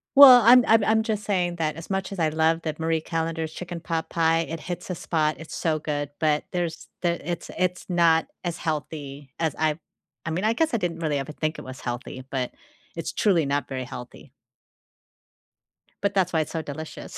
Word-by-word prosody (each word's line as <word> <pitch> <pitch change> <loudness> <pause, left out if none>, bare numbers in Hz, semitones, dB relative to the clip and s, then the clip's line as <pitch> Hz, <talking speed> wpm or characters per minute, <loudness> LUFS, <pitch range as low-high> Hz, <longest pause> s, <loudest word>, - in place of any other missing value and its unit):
Well, 260 -3 +11
I'm 245 +2 +8
I'm 225 -1 +5
I'm 220 +1 +3
just 215 -2 -2
saying 175 -3 0
that 155 -2 -1
as 165 +4 -9
much 190 0 -2
as 195 - -6
I 160 -2 +3
love 160 +1 +1
that 155 -1 -4
Marie 160 0 +1
Callender's 165 -1 -3
chicken 175 0 -6
pot 165 0 -3
pie, 165 -1 +2
it 165 0 -3
hits 180 +2 -6
a 180 - -2
spot, 155 -2 0
it's 160 - -8
so 155 -2 0
good, 145 -1 -3
but 150 -1 +1
there's 175 -3 -3
there 170 -1 0
it's 170 +2 -4
it's 180 0 0
not 170 -2 +4 0.2
as 175 -2 -3
healthy 145 -3 -5
as 160 -2 0
I 155 -1 +1 0.5
I 160 - -2
mean, 175 +4 -2
I 220 - +3
guess 315 +4 +1
I - - +3
didn't 175 -5 -2
really 150 -3 0
ever 135 +2 -5
think 155 +1 -2
it - - -6
was 130 0 -8
healthy, 120 +1 -5
but 130 -2 -2 0.4
it's - - -4
truly 175 -7 +3
not 140 +1 -1
very 130 -1 -4
healthy. 125 0 -10 1.7
But 200 0 +1
that's 185 -2 +1
why 160 - +3
it's 155 - -5
so 165 - -2
delicious. 155 +1 -8
165 Hz, 205 wpm, -25 LUFS, 155-180 Hz, 1.7 s, Well